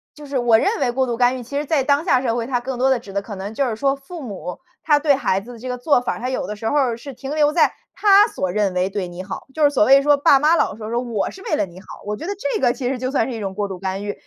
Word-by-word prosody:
就 295 Hz, -, -11 dB
是 280 Hz, -2 st, -3 dB
我 235 Hz, -2 st, +4 dB
认 415 Hz, -, 0 dB
为 245 Hz, -, +1 dB
过 265 Hz, +1 st, +1 dB
度 235 Hz, -2 st, -3 dB
干 250 Hz, +1 st, +3 dB
预， 245 Hz, -, -7 dB
其 280 Hz, +4 st, -5 dB
实 295 Hz, -, -1 dB
在 285 Hz, -2 st, +1 dB
当 285 Hz, +3 st, +1 dB
下 255 Hz, -8 st, +3 dB
社 235 Hz, -3 st, 0 dB
会， 235 Hz, -1 st, -2 dB
它 250 Hz, -2 st, -1 dB
更 250 Hz, 0 st, -5 dB
多 265 Hz, +1 st, +3 dB
地 265 Hz, -, +3 dB
指 200 Hz, -, -12 dB
的， 200 Hz, 0 st, -1 dB
可 205 Hz, -1 st, -8 dB
能 200 Hz, +3 st, -6 dB
就 275 Hz, +3 st, 0 dB
是 225 Hz, -, -2 dB
说 275 Hz, +4 st, +1 dB
父 310 Hz, +4 st, -10 dB
母 195 Hz, -7 st, -7 dB, 0.2 s
他 295 Hz, -2 st, +4 dB
对 290 Hz, -2 st, +3 dB
孩 195 Hz, -7 st, 0 dB
子 240 Hz, +5 st, -11 dB
的 230 Hz, -, -12 dB
这 255 Hz, -, -8 dB
个 250 Hz, -, -3 dB
做 250 Hz, +1 st, +3 dB
法， 245 Hz, -, -3 dB
他 250 Hz, +2 st, -3 dB
有 260 Hz, -, -3 dB
的 210 Hz, -, -4 dB
时 220 Hz, +1 st, -3 dB
候， 260 Hz, -5 st, +1 dB
是 275 Hz, +4 st, -9 dB
停 270 Hz, +4 st, -6 dB
留 300 Hz, -1 st, +3 dB
在 330 Hz, -, +3 dB, 0.2 s
他 405 Hz, 0 st, +6 dB
所 185 Hz, -, -3 dB
认 200 Hz, -2 st, 0 dB
为 180 Hz, +1 st, 0 dB
对 195 Hz, -2 st, -3 dB
你 175 Hz, +1 st, -8 dB
好。 190 Hz, -, -7 dB
就 315 Hz, -, -1 dB
是 290 Hz, -, +6 dB
所 265 Hz, -7 st, +3 dB
谓 275 Hz, +1 st, +6 dB
说 290 Hz, 0 st, +4 dB
爸 280 Hz, -1 st, +5 dB
妈 305 Hz, +4 st, +4 dB
老 195 Hz, -, +1 dB
说， 215 Hz, 0 st, -7 dB
说： 235 Hz, +1 st, 0 dB
“我 225 Hz, -5 st, -2 dB
是 380 Hz, -, -13 dB
为 -, -, 0 dB
了 250 Hz, -, 0 dB
你 175 Hz, +2 st, -13 dB
好。” -, -, -12 dB
我 210 Hz, +1 st, -2 dB
觉 -, -, -7 dB
得 405 Hz, -, -1 dB
这 285 Hz, -8 st, -2 dB
个 245 Hz, -2 st, +3 dB
其 250 Hz, -3 st, -3 dB
实 265 Hz, -, -2 dB
就 255 Hz, 0 st, -2 dB
算 265 Hz, -3 st, +1 dB
是 -, -, -4 dB
一 -, -, -5 dB
种 195 Hz, -2 st, -4 dB
过 205 Hz, +1 st, -2 dB
度 190 Hz, -, -6 dB
干 190 Hz, +1 st, -3 dB
预。 205 Hz, -, -2 dB
250 Hz, 360 characters per minute, -21 LUFS, 210-285 Hz, 0.2 s, 他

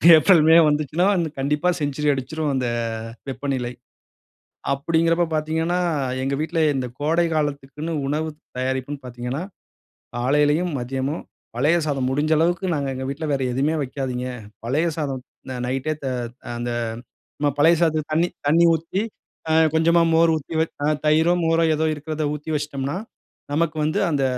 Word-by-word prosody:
April, 165 Hz, +1 st, +6 dB
மே 165 Hz, -, +8 dB
வந்துச்சுன்னா 150 Hz, +4 st, +1 dB
வந்து, 170 Hz, -3 st, 0 dB
கண்டிப்பா 150 Hz, +5 st, +1 dB
செஞ்சுரி 145 Hz, +1 st, 0 dB
அடுச்சுரும், 150 Hz, +3 st, -2 dB
அந்த 130 Hz, -2 st, 0 dB, 0.6 s
வெப்பநிலை. 130 Hz, -2 st, -2 dB, 1.0 s
அப்பிடிங்கறப்போ 165 Hz, +4 st, +2 dB
பாத்தீங்கன்னா, 160 Hz, +3 st, 0 dB, 0.4 s
எங்க 135 Hz, +1 st, 0 dB
வீட்ல 165 Hz, +2 st, -1 dB, 0.2 s
இந்த 130 Hz, -2 st, -1 dB
கோடைகாலத்துக்குன்னு 155 Hz, -1 st, -1 dB
உணவு 155 Hz, +3 st, -1 dB, 0.3 s
தயாரிப்புன்னு 130 Hz, +2 st, -2 dB
பாத்தீங்கன்னா, 125 Hz, +3 st, -4 dB, 0.8 s
காலையிலயும், 150 Hz, +7 st, +2 dB
மதியமும் 135 Hz, +5 st, -3 dB, 0.3 s
பழைய 145 Hz, +7 st, +3 dB
சாதம், 135 Hz, -3 st, 0 dB
முடுஞ்ச 145 Hz, +4 st, +1 dB
அளவுக்கு 175 Hz, +3 st, +1 dB
நாங்க 140 Hz, -2 st, -1 dB
எங்க 130 Hz, 0 st, -4 dB
வீட்ல 155 Hz, +3 st, -4 dB
வேற 135 Hz, -1 st, 0 dB
எதுவுமே 140 Hz, +5 st, +1 dB
வைக்காதீங்க. 130 Hz, -2 st, -3 dB, 0.4 s
பழைய 145 Hz, +8 st, +1 dB
சாதம் 140 Hz, -5 st, -3 dB, 0.2 s
அந்த 130 Hz, -, -6 dB
நைட்டே, 135 Hz, +4 st, -1 dB
த -, -, -1 dB, 0.5 s
அந்த 120 Hz, 0 st, -3 dB, 0.7 s
நம்ம 145 Hz, 0 st, +2 dB
பழைய 160 Hz, +4 st, +6 dB
சாதத்துக்கு 155 Hz, -2 st, +1 dB
தண்ணீ, 165 Hz, +3 st, +2 dB, 0.2 s
தண்ணீ 165 Hz, +4 st, +5 dB
ஊத்தி, 165 Hz, +5 st, -2 dB, 0.5 s
அ, -, -, +3 dB, 0.2 s
கொஞ்சமா 170 Hz, +1 st, +4 dB
மோரு 165 Hz, 0 st, +5 dB
ஊத்தி 155 Hz, +2 st, -6 dB
வச் 160 Hz, -, -1 dB
அ, -, -, +2 dB, 0.2 s
தயிரோ! 160 Hz, +3 st, +4 dB
மோரோ! 165 Hz, 0 st, +3 dB
எதோ 160 Hz, +1 st, +1 dB
இருக்குறத 155 Hz, +1 st, -4 dB
ஊத்தி 150 Hz, +2 st, -7 dB
வச்சுட்டம்ன்னா, 145 Hz, 0 st, -2 dB, 0.6 s
நமக்கு 160 Hz, +1 st, 0 dB
வந்து 155 Hz, +6 st, 0 dB
அந்த 145 Hz, -3 st, 0 dB
150 Hz, 140 wpm, -23 LUFS, 135-160 Hz, 1.0 s, மே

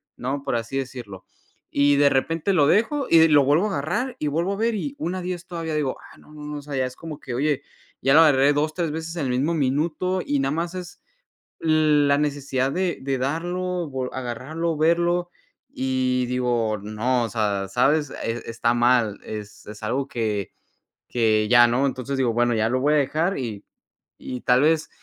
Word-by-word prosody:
¿no? 135 Hz, +3 st, -3 dB
Por 120 Hz, -, -1 dB
así 115 Hz, +4 st, -4 dB
decirlo. 120 Hz, -8 st, -6 dB, 0.5 s
Y 145 Hz, 0 st, +3 dB
de 140 Hz, 0 st, +5 dB
repente 165 Hz, +8 st, 0 dB
lo 145 Hz, -5 st, +4 dB
dejo 255 Hz, -, +2 dB
y 165 Hz, -, +6 dB
de 160 Hz, 0 st, +6 dB
lo 145 Hz, -2 st, +6 dB
vuelvo 155 Hz, +8 st, +3 dB
a -, -, -1 dB
agarrar, 175 Hz, -, -2 dB
y 150 Hz, -, -1 dB
vuelvo 170 Hz, +7 st, 0 dB
a -, -, -5 dB
ver 230 Hz, 0 st, 0 dB
y 280 Hz, +7 st, -4 dB
1:10 180 Hz, -, -4 dB
todavía 165 Hz, -2 st, -4 dB
digo: 145 Hz, -4 st, -1 dB, 0.2 s
"Ah, -, -, -18 dB
no, -, -, -19 dB
no, 150 Hz, -, -10 dB
no", 150 Hz, 0 st, -5 dB
o -, -, -10 dB
sea, 145 Hz, -1 st, -7 dB
ya 130 Hz, -1 st, +1 dB
es 130 Hz, -, -6 dB
como 160 Hz, -3 st, -8 dB
que, 125 Hz, -, -7 dB
oye, 145 Hz, +2 st, 0 dB, 0.4 s
ya 135 Hz, +2 st, +3 dB
lo 160 Hz, -, +8 dB
agarré 145 Hz, -2 st, +5 dB
2 155 Hz, +2 st, 0 dB
3 170 Hz, -4 st, -2 dB
veces 160 Hz, +1 st, -5 dB
en 145 Hz, -, -1 dB
el -, -, -1 dB
mismo 140 Hz, +7 st, 0 dB
minuto 160 Hz, +6 st, 0 dB
y 145 Hz, -1 st, 0 dB
nada 135 Hz, 0 st, 0 dB
más 170 Hz, +2 st, -2 dB
es 180 Hz, -1 st, -8 dB, 0.6 s
la 150 Hz, -3 st, +3 dB
necesidad 140 Hz, -2 st, -1 dB
de 185 Hz, -1 st, -1 dB
de 135 Hz, 0 st, -1 dB
darlo, 175 Hz, +4 st, -2 dB
vo 130 Hz, -2 st, -4 dB
agarrarlo, 140 Hz, +7 st, -3 dB
verlo 175 Hz, +2 st, +1 dB, 0.4 s
y 130 Hz, -1 st, 0 dB
digo, 120 Hz, -4 st, 0 dB
no, 115 Hz, +4 st, 0 dB
o -, -, -2 dB
sea, 100 Hz, -4 st, -1 dB
¿sabes? 145 Hz, +3 st, +2 dB
Es 115 Hz, +1 st, -3 dB
está 115 Hz, +1 st, 0 dB
mal, 120 Hz, -3 st, +2 dB
es 105 Hz, -1 st, -8 dB
es 105 Hz, +1 st, -10 dB
algo 135 Hz, +5 st, -1 dB
que 105 Hz, -4 st, -2 dB, 0.6 s
que 110 Hz, -3 st, +2 dB
ya, 120 Hz, 0 st, +7 dB
¿no? 130 Hz, +4 st, +1 dB
Entonces 135 Hz, +1 st, -3 dB
digo, 120 Hz, -3 st, +2 dB
bueno, 120 Hz, 0 st, +2 dB
ya 110 Hz, 0 st, +1 dB
lo 130 Hz, +1 st, 0 dB
voy 150 Hz, +2 st, +2 dB
a -, -, +4 dB
dejar 155 Hz, +6 st, 0 dB
y 110 Hz, -5 st, -5 dB, 0.6 s
y 125 Hz, -1 st, -6 dB
tal 125 Hz, +2 st, +3 dB
vez, 160 Hz, +1 st, +2 dB
140 Hz, 200 wpm, -23 LUFS, 125-165 Hz, 0.6 s, lo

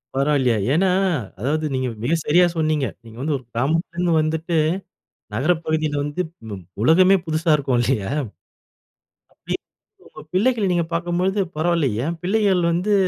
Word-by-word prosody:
பரவால்லையே. 135 Hz, -3 st, +2 dB, 0.2 s
ஏன்னா, 185 Hz, +5 st, +3 dB, 0.5 s
அதாவது 150 Hz, +7 st, -1 dB
நீங்க 130 Hz, -1 st, -1 dB, 0.2 s
மிக 145 Hz, -, +1 dB
சரியா 175 Hz, +4 st, +5 dB
சொன்னீங்க. 155 Hz, -4 st, +1 dB, 0.2 s
நீங்க 115 Hz, 0 st, -12 dB
வந்து 150 Hz, +1 st, 0 dB
ஒரு 130 Hz, -, -13 dB
கிராமத்திலேருந்து 165 Hz, +7 st, 0 dB
வந்துட்டு, 160 Hz, +2 st, -1 dB, 0.8 s
நகர 135 Hz, +10 st, +2 dB
பகுதியில 155 Hz, -2 st, 0 dB
வந்துப் 160 Hz, +3 st, -3 dB, 0.2 s
ம் 95 Hz, -3 st, -7 dB, 0.2 s
உலகமே 185 Hz, +8 st, +6 dB
புதுசா 160 Hz, +1 st, 0 dB
இருக்கும் 135 Hz, -4 st, 0 dB
இல்லையா? 115 Hz, -6 st, 0 dB, 1.2 s
அப்படி -, -, -5 dB, 0.5 s
உங்க -, -, -13 dB
பிள்ளைகள 225 Hz, +2 st, +2 dB
நீங்க 175 Hz, -2 st, +1 dB
பார்க்கும்பொழுது, 175 Hz, +4 st, 0 dB, 0.2 s
"பரவாயில்லை, 165 Hz, -3 st, +2 dB, 0.2 s
ஏன் 170 Hz, +2 st, -2 dB
பிள்ளைகள் 195 Hz, -1 st, +2 dB
வந்து 180 Hz, +5 st, +1 dB
160 Hz, 135 wpm, -22 LUFS, 140-175 Hz, 1.2 s, உலகமே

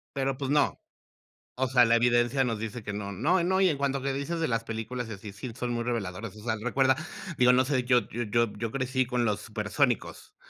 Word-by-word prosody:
Pero, 135 Hz, -1 st, -1 dB
pues, 140 Hz, 0 st, -3 dB
no. 145 Hz, 0 st, +2 dB, 0.8 s
O 130 Hz, 0 st, 0 dB
sea, 125 Hz, -1 st, +6 dB
la 115 Hz, +1 st, +4 dB
evidencia 120 Hz, +2 st, +3 dB
nos 115 Hz, -4 st, -1 dB
dice 110 Hz, +2 st, -5 dB
que 105 Hz, 0 st, -5 dB
no, 100 Hz, -1 st, -4 dB
no. 165 Hz, -, +2 dB
No, 190 Hz, +2 st, +2 dB
y 190 Hz, -, +5 dB
en 150 Hz, -, 0 dB
cuanto 140 Hz, -1 st, -1 dB
que 135 Hz, 0 st, -1 dB
dices 165 Hz, +5 st, -3 dB
de 160 Hz, -, +1 dB
las 115 Hz, -1 st, -1 dB
películas 115 Hz, +2 st, -4 dB
y -, -, -6 dB
así, 100 Hz, 0 st, -8 dB
sí 115 Hz, +4 st, -7 dB
son 125 Hz, 0 st, -3 dB
muy 120 Hz, 0 st, -2 dB
reveladoras, 105 Hz, -3 st, -3 dB
o 105 Hz, -, -11 dB
sea, 110 Hz, -1 st, -1 dB
recuerda, 130 Hz, +1 st, +3 dB, 0.4 s
digo, 125 Hz, 0 st, +5 dB
no 130 Hz, +1 st, +4 dB
sé, 130 Hz, -3 st, +1 dB
yo 125 Hz, -1 st, +3 dB
yo 120 Hz, -, -3 dB
yo 115 Hz, +1 st, +1 dB
yo 115 Hz, +1 st, -3 dB
crecí 130 Hz, 0 st, 0 dB
con 125 Hz, -1 st, 0 dB
los 105 Hz, -1 st, 0 dB
Supersónicos, 110 Hz, +3 st, -1 dB
125 Hz, 235 wpm, -28 LUFS, 110-135 Hz, 0.8 s, sea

